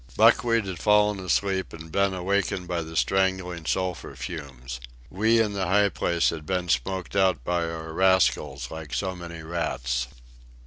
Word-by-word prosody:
Buckwheat 115 -2 +4
had 95 -4 -5
fallen 105 0 +3
asleep 95 +1 0
and 80 0 -10
been 100 +2 +2
awakened 95 0 -1
by 85 -1 -1
the 80 0 -8
strangling 95 -2 0
sulphur 95 -2 -2
fumes. 65 -6 -7 0.3
We 110 +4 +3
in 105 -2 +1
the 95 -3 -1
high 100 +2 +4
place 85 -3 +1
had 80 -2 -6
been 90 +2 -2
smoked 90 +9 -1
out 95 -2 +3
by 85 -1 0
our 80 -1 -6
rascals 70 -8 +2
like 80 -3 -6
so 95 -2 -2
many 85 -2 -8
rats. 65 -7 -2
90 Hz, 160 wpm, -26 LUFS, 80-95 Hz, 0.3 s, Buckwheat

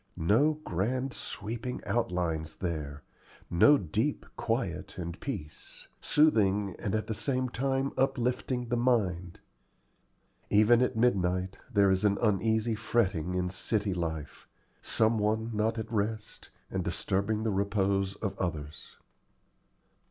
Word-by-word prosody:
No 115 - +3
grand 125 - -1
sweeping 115 +4 -5
outlines 85 -8 -1
there, 75 -5 -4 0.5
no 145 +12 +6
deep 110 - -1
quiet - - -2
and 85 0 -5
peace, 90 - -7
soothing 105 - +3
and 100 - -1
at 110 - -1
the 110 - -3
same 130 +2 -1
time 135 +2 -1
uplifting 125 -2 0
the 120 - +1
mind. 95 -8 0 1.1
Even 110 +4 +5
at 125 - +1
midnight 95 -5 +1
there 100 -1 +4
is 95 +1 +1
an 100 -1 +3
uneasy 110 +1 +2
fretting 95 -6 0
in 90 0 0
city 100 +2 -1
life 80 -4 -4 0.3
some 110 0 +2
one 110 +2 0
not 110 +2 0
at 110 +1 -5
rest, 110 0 -3 0.2
and - - -1
disturbing 105 +3 -1
the 110 - 0
repose 100 -1 0
of 100 -2 -4
others. 75 -5 -5
105 Hz, 120 wpm, -30 LUFS, 90-120 Hz, 1.1 s, no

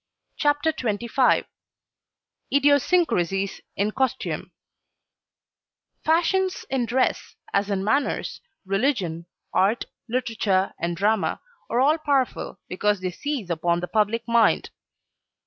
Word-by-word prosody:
CHAPTER 290 +2 +2
XXV 235 +2 +1 1.1
IDIOSYNCRASIES 275 - +2
IN 205 +2 0
COSTUME 260 +1 -2 1.5
Fashions 365 +4 +1
in 255 -3 0
dress 255 +3 0 0.2
as 200 +1 +1
in 195 -1 -1
manners, 275 +7 0 0.2
religion, 195 - 0 0.3
art, 205 +5 +2 0.2
literature 215 -6 0
and 170 0 -2
drama, 210 +2 +1 0.3
are 235 - +1
all 300 +4 +4
powerful 280 -4 0
because 205 +2 0
they 185 -1 -2
seize 250 - -4
upon 170 +1 +1
the 180 - -4
public 220 +2 +1
mind. 235 -1 +3
230 Hz, 100 wpm, -24 LUFS, 195-275 Hz, 1.5 s, all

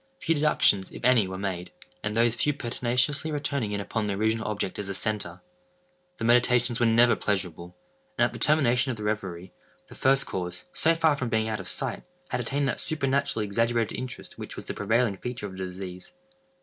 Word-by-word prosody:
Few 165 - +1
deductions, 145 -10 +3
if - - -7
any, 125 -6 +5
were 95 0 -5
made; 95 -2 -4 0.3
and 105 0 -3
those 115 0 +4
few 145 +5 +1
pertinaciously 125 +4 0
returning 140 -6 -2
in 100 - -1
upon 105 +1 -2
the 100 - -1
original 110 +2 0
object 105 -2 -3
as 100 -1 -4
a 100 - -3
centre. 100 -5 -2 0.8
The - - -6
meditations 120 0 +3
were 120 - +4
never 120 +2 +5
pleasurable; 90 -3 -3 0.4
and, - - +5
at - - -2
the - - -7
termination 135 -4 +3
of 120 - -2
the 105 - -6
reverie, 95 -4 -3 0.4
the - - -11
first 135 +1 +3
cause, 90 -1 -4
so 165 +1 +3
far 160 -2 +3
from 130 -4 -3
being 110 -1 +1
out 110 -1 -2
of 95 - -7
sight, 135 -4 -2 0.3
had - - -1
attained 140 +4 0
that - - -1
supernaturally 140 -6 0
exaggerated 115 +2 0
interest 130 0 -7
which - - -7
was - - -8
the - - -4
prevailing 110 0 +1
feature 125 0 -5
of 100 - -6
the 95 0 -5
disease. 90 - -8
115 Hz, 200 wpm, -27 LUFS, 100-130 Hz, 0.8 s, any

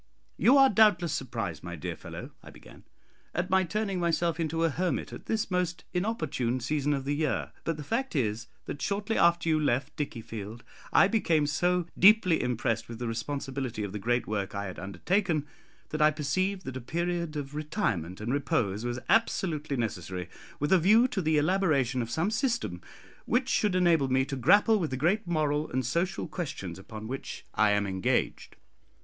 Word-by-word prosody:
"You 260 +4 +5
are 270 0 +8
doubtless 195 - +4
surprised, 105 - -3
my 85 0 -6
dear 75 - -5
fellow," - - -9
I - - -12
began, - - -15 0.5
"at 175 +2 -1
my 190 0 +4
turning 195 +1 -2
myself 170 -1 0
into 165 0 0
a 165 - +2
hermit 180 +4 -2
at - - -10
this 220 -3 -1
most 180 -1 -1
inopportune 155 - -1
season 145 +3 0
of 135 -1 -4
the 145 - 0
year; 150 -1 -1
but 165 -2 -1
the 150 - -6
fact 235 - -2
is, 115 -4 -1 0.2
that 145 - -6
shortly 205 +2 -1
after 170 0 +3
you 155 -1 +3
left 140 -1 0
Dickiefield, 115 -5 -6 0.3
I - - +6
became 170 -8 +2
so 175 +4 +1
deeply 190 -4 +6
impressed 120 -2 -1
with 115 - -6
the 120 0 -4
responsibility 130 0 -3
of 100 - -4
the 105 - -4
great 120 +3 0
work 100 -2 -3
I 100 0 -3
had 95 - -7
undertaken, 160 - 0 0.4
that 155 - -3
I 150 - +7
perceived 185 +6 -1
that 130 -1 -5
a - - -6
period 170 +3 -2
of 145 -1 -5
retirement 130 - -2
and 115 +4 -2
repose 115 -7 0
was 120 0 -2
absolutely 160 -10 +1
necessary 90 -5 -3 0.3
with 145 +5 +1
a 190 - +6
view 215 +8 +5
to 195 - -2
the 155 -2 +2
elaboration 150 -7 +2
of 115 - -4
some 165 - 0
system 230 - -1 0.5
which 255 +2 +1
should 210 -7 +2
enable 170 -6 +3
me 130 +1 +2
to 140 - -4
grapple 205 - +4
with 165 -5 -1
the 130 - -3
great 180 - +1
moral 155 -2 0
and 130 0 -1
social 170 +10 -1
questions 135 - -5
upon 110 +3 -8
which 135 +3 -6
I 105 +1 +3
am 105 0 +2
engaged. 95 -1 -1
150 Hz, 185 wpm, -29 LUFS, 120-180 Hz, 0.5 s, are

